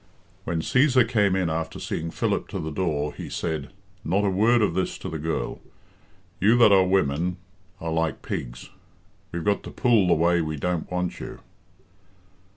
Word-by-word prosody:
When 85 -1 -1
Cæsar 130 - +3
came 105 -5 +2
in 95 -2 +1
after 80 0 -3
seeing 85 +1 -3
Philip - - -1
to - - -5
the 80 - -4
door, 75 -4 -1
he - - -8
said, 80 -4 -3 0.3
"Not 100 +5 +1
a 100 - +2
word 110 +4 +3
of 95 - +1
this 95 +1 -1
to - - -6
the 80 - -5
girl. 80 +2 -3 0.8
You 110 +5 +4
that 115 -3 +7
are 95 -2 +5
women 90 -1 +1 0.4
are 80 0 -4
like 80 -3 -1
pigs - - -6 0.6
we've 85 -1 -4
got 100 0 +2
to - - -9
pull 115 -7 +3
the 90 - +4
way 85 +2 +3
we 80 -1 -3
don't 90 +2 -2
want 90 -1 -2
you." - - -8
90 Hz, 175 wpm, -25 LUFS, 80-100 Hz, 0.8 s, that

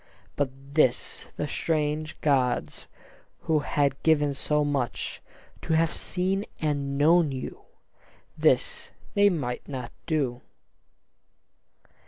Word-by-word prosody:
But 145 -2 +1 0.2
this 130 -5 +1
the 150 - -1
strange 155 +1 -1
gods, 130 -4 +1 0.5
who 155 -1 +2
had 140 -2 0
given 150 -3 +3
so 150 +2 +1
much, 140 -4 -2 0.4
To - - -1
have 160 0 +3
seen 190 +2 -1 0.2
and 140 -3 -1
known 160 +1 +5
you, 130 -1 -6 0.7
this - - +2 0.2
they 205 0 +5
might 135 -9 -3
not 130 -4 -5 0.2
do. 135 -7 0
150 Hz, 105 wpm, -27 LUFS, 140-160 Hz, 0.7 s, known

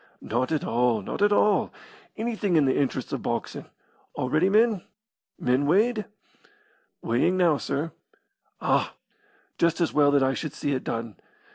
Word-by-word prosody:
"Not 125 +5 -2
at 155 - 0
all. 115 -2 +1
Not - - -5
at 205 0 +4
all. 205 0 +3 0.5
Anything 220 -5 -1
in 150 -3 +4
the 130 - +2
interests 140 -2 -1
of - - -2
boxin'. - - -4 0.5
All 130 - -3
ready? 160 +5 +3
Men 215 -1 +3 0.6
weighed?" 190 - +2 1.0
"Weighing 125 +11 +1
now, 170 -5 +3
sir." 150 +4 -3 0.7
"Ah! - - 0 0.6
Just 170 0 +2
as 170 - 0
well 145 -1 +4
that 140 -1 +3
I 135 0 +2
should 150 +1 -5
see 145 - -2
it 130 - -2
done. 115 -2 -4
150 Hz, 150 wpm, -26 LUFS, 130-195 Hz, 1.0 s, at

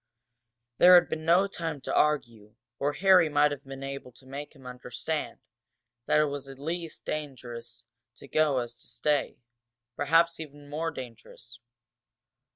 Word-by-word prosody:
There 180 +1 +9
had 175 - +6
been 155 0 -4
no 175 +4 +5
time 165 -6 -4
to - - -4
argue, 115 -8 0 0.2
or 145 +1 0
Harry 185 0 +5
might 145 0 +4
have 140 -1 -5
been 135 0 -8
able 135 -2 -6
to 130 - -16
make 140 +3 -8
him 135 -2 -17
understand 125 +5 -4 0.7
that - - +4
it 150 - +4
was 140 -1 -5
at 135 - -10
least 165 +3 -5
as - - -52
dangerous 120 -5 -7 0.3
to - - -13
go 150 0 +2
as 120 -1 -2
to 120 - -13
stay 150 -1 0 0.6
perhaps 165 +3 +3
even 145 -2 -10
more 160 +2 -1
dangerous. 120 -3 -10
145 Hz, 160 wpm, -28 LUFS, 130-160 Hz, 0.7 s, There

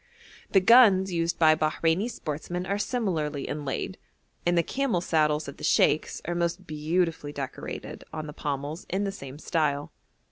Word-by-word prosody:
The 195 - +5
guns 195 -4 +6
used 170 0 0
by 160 -1 +6
Bahreini 160 +6 +1
sportsmen 175 -1 -4
are 200 +2 -1
similarly 165 - -1
inlaid, 145 -3 -4 0.5
and 175 0 +3
the 170 - +4
camel 265 - 0
saddles 155 -3 +1
of 140 - -8
the - - -11
sheikhs 155 - +2
are 175 - -1
most 170 +2 -1
beautifully 160 0 -1
decorated 140 -2 -6
on 155 -1 -5
the 150 - -7
pommels 145 +3 -4
in 190 +3 0
the 200 - -1
same 140 -8 -9
style. 150 -3 -1
165 Hz, 155 wpm, -27 LUFS, 150-185 Hz, 0.5 s, guns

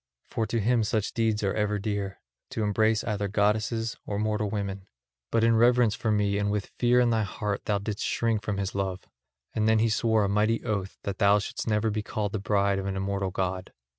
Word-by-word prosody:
For 110 - -1
to 115 +2 0
him 115 +2 +2
such 105 0 -1
deeds 110 -2 0
are 100 - +1
ever 105 -1 0
dear, 100 -1 -3 0.3
to 110 - -2
embrace 110 +1 +2
either 105 -2 -1
goddesses 110 +3 0
or 100 - -4
mortal 105 0 0
women. 100 -2 -4 0.4
But 115 - +2
in 115 0 +4
reverence 120 -1 +4
for 110 - -2
me 100 -1 +1
and 105 0 0
with 105 -1 -2
fear 125 0 +4
in 120 -1 +3
thy 110 -1 +2
heart 105 0 -3
thou 105 - +1
didst 100 +1 -4
shrink 115 -2 0
from 100 -1 -3
his 100 -1 -2
love; 95 -2 -3 0.5
and 110 0 +1
he 110 - +5
then 110 +1 +3
swore 110 -1 +2
a - - +1
mighty 105 +3 +1
oath 100 -4 -2
that 100 -1 -4
thou 100 0 +5
shouldst 105 - -4
never 110 0 +1
be 105 +1 -1
called 105 -1 -3
the 110 - -2
bride 100 0 +1
of 95 - -4
an 95 - -2
immortal 95 0 -1
god. 95 0 -3
105 Hz, 220 wpm, -27 LUFS, 100-110 Hz, 0.5 s, he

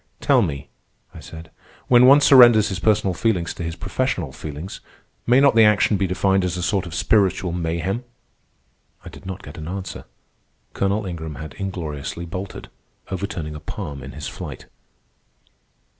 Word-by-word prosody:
"Tell - - +3
me," 70 -1 -3 0.5
I - - -10
said, 80 0 -11 0.4
"when 125 0 +6
one 140 +2 +7
surrenders 120 -6 +7
his 95 -2 -4
personal 100 -2 +2
feelings 90 -4 0
to - - -9
his 85 0 -4
professional 90 - -2
feelings, 75 +5 -8 0.5
may 125 +2 +5
not 140 0 +5
the 115 - +5
action 105 0 +4
be 95 -1 0
defined 95 +1 +1
as 90 -1 -2
a 90 - -3
sort 90 0 0
of 85 - -7
spiritual 95 -2 +2
mayhem?" 85 +6 -2 1.0
I - - -7
did - - -13
not 95 +1 -6
get - - -10
an 80 - -7
answer. 95 +1 -6 0.7
Colonel 100 +2 0
Ingram 80 -4 -6
had 80 -1 -8
ingloriously 85 -4 -5
bolted, 95 +3 -7 0.4
overturning 95 -5 -4
a 75 - -7
palm 75 -5 -7
in - - -9
his 75 - -6
flight. - - -8
95 Hz, 160 wpm, -22 LUFS, 80-100 Hz, 1.0 s, one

